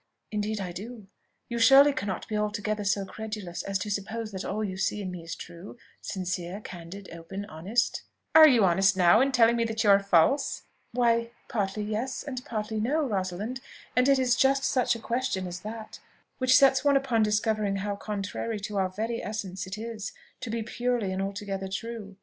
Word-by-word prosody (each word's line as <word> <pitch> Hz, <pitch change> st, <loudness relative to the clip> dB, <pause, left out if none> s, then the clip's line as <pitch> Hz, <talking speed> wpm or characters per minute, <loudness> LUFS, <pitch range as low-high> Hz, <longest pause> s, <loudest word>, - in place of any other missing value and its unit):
"Indeed 210 Hz, 0 st, -2 dB
I 185 Hz, -3 st, -4 dB
do. 210 Hz, +3 st, -9 dB, 0.4 s
You 235 Hz, 0 st, -3 dB
surely 270 Hz, +5 st, +7 dB
cannot 200 Hz, -7 st, -4 dB
be 215 Hz, -, -3 dB
altogether 210 Hz, 0 st, -1 dB
so 200 Hz, 0 st, +1 dB
credulous 210 Hz, -4 st, -6 dB
as 195 Hz, 0 st, -1 dB
to 205 Hz, +3 st, -4 dB
suppose 215 Hz, +2 st, -3 dB
that 190 Hz, -1 st, -5 dB
all 215 Hz, +2 st, -2 dB
you 190 Hz, -3 st, -3 dB
see 200 Hz, +2 st, -1 dB
in 190 Hz, -3 st, -4 dB
me 180 Hz, -1 st, -7 dB
is 165 Hz, 0 st, -6 dB
true, 175 Hz, +6 st, -10 dB, 0.2 s
sincere, 185 Hz, 0 st, -4 dB
candid, 185 Hz, 0 st, -9 dB
open, 170 Hz, +4 st, -7 dB
honest?" 200 Hz, +8 st, -1 dB, 0.3 s
"Are 315 Hz, -1 st, +10 dB
you 240 Hz, -8 st, +5 dB
honest 190 Hz, +2 st, +3 dB
now 180 Hz, +5 st, +6 dB
in 275 Hz, +1 st, +3 dB
telling 235 Hz, -2 st, +5 dB
me 235 Hz, -, +1 dB
that 225 Hz, 0 st, -1 dB
you 205 Hz, -, +6 dB
are 200 Hz, -, +7 dB
false?" 200 Hz, -, +2 dB, 0.3 s
"Why, 235 Hz, -1 st, +2 dB, 0.2 s
partly 210 Hz, -3 st, -2 dB
yes, 220 Hz, +5 st, -3 dB
and 255 Hz, -3 st, -5 dB
partly 215 Hz, -1 st, -3 dB
no, 290 Hz, +8 st, +1 dB
Rosalind; 205 Hz, +3 st, -3 dB, 0.3 s
and 250 Hz, +2 st, +4 dB
it 275 Hz, -, +5 dB
is 250 Hz, -2 st, +3 dB
just 270 Hz, +2 st, +3 dB
such 255 Hz, -2 st, +2 dB
a -, -, -6 dB
question 230 Hz, -5 st, -1 dB
as 180 Hz, 0 st, -5 dB
that 215 Hz, +3 st, -8 dB, 0.4 s
which 255 Hz, 0 st, +5 dB
sets 270 Hz, 0 st, +5 dB
one 285 Hz, -1 st, +5 dB
upon 255 Hz, -5 st, +1 dB
discovering 215 Hz, -1 st, +1 dB
how 200 Hz, +1 st, -2 dB
contrary 210 Hz, +2 st, -4 dB
to 210 Hz, 0 st, -4 dB
our 190 Hz, -1 st, +1 dB
very 225 Hz, +5 st, -3 dB
essence 195 Hz, -3 st, -4 dB
it 190 Hz, +2 st, -5 dB
is, 220 Hz, -2 st, -5 dB, 0.3 s
to 245 Hz, -, -6 dB
be 225 Hz, 0 st, -2 dB
purely 240 Hz, -3 st, -1 dB
and 190 Hz, -, -2 dB
altogether 195 Hz, 0 st, -4 dB
true. 205 Hz, 0 st, -6 dB
210 Hz, 190 wpm, -28 LUFS, 195-235 Hz, 0.4 s, Are